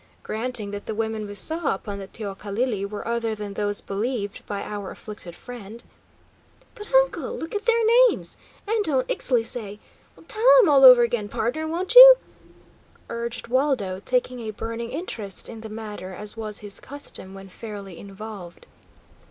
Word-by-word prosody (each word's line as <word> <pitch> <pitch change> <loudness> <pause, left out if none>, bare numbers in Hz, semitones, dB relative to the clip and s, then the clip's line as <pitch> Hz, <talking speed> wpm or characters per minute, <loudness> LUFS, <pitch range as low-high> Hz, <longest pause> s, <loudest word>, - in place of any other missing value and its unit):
Granting 220 -2 -4
that 205 0 -7
the 220 - -3
women 220 -1 -3
we 205 - -6
saw 315 - +3
upon 200 +1 -7
the 195 - -7
teocalli 205 +2 -3
were 210 +1 -6
other 230 -1 -1
than 205 -1 -6
those 205 0 -1
believed 205 0 -3
by 205 -1 -4
our 205 -2 -6
afflicted 200 -5 -9
friend 235 -1 -10 0.4
" - - -32
"But, 420 - -11
uncle, - - +2
look 325 - -6
at 415 +1 -3
their 465 -1 +3 0.2
names! - - -4 0.3
And 440 0 +1
don't 270 -7 +1
Ixtli 240 -3 +1
say 210 -4 -3 0.5
tell 455 +4 +4
'em 390 - +3
all 275 -2 +5
over 250 -2 +10
again, 235 -3 -1
pardner, 275 +11 -2
won't 355 +6 -1
ye?" - - +12 1.0
urged 235 0 -5
Waldo, 245 -7 0
taking 250 +3 -1
a 225 -2 -5
burning 230 +2 -5
interest 220 - -4
in 225 -1 -9
the 220 - -8
matter, 210 -3 -7
as 210 +2 -7
was 215 -2 -5
his 205 -1 -4
custom 270 -9 -7
when 195 0 -10
fairly 200 -3 -9
involved. 200 -3 -10
225 Hz, 165 wpm, -24 LUFS, 205-255 Hz, 1.0 s, ye